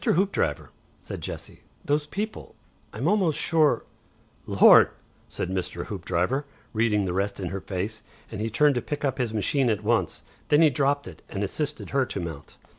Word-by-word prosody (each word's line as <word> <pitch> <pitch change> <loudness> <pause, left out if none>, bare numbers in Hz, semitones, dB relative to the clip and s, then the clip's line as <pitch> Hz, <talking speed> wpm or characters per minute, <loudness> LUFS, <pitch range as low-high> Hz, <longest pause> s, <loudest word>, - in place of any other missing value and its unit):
Hoopdriver," 195 +4 +1 0.3
said - - -7
Jessie. - - -7 0.2
"Those 150 -1 +1
people 215 +6 -5 0.4
I'm 125 +8 -2
almost 185 -6 +2
sure 155 -3 +3 0.3
" - - -34
"Lord!" - - +9 0.4
said 90 - -3
Mr. 90 -2 -3
Hoopdriver, 95 +8 -1 0.3
reading 110 -3 +2
the 90 - -2
rest 100 +2 -1
in 90 -3 -3
her 95 +2 -4
face, 100 +4 -3 0.3
and 110 -2 -5
he 110 - -1
turned 145 +6 +4
to 125 - -1
pick 150 -1 -3
up 135 0 -1
his 120 -3 0
machine 120 +4 +1
at 105 -1 0
once. 105 -7 0 0.2
Then 150 +2 +5
he 155 - +6
dropped 140 0 +1
it 85 -4 -11
and 100 - -3
assisted 150 +8 -3
her 135 -2 +2
to - - -4
mount. 80 -5 -7
115 Hz, 180 wpm, -26 LUFS, 95-145 Hz, 0.4 s, Lord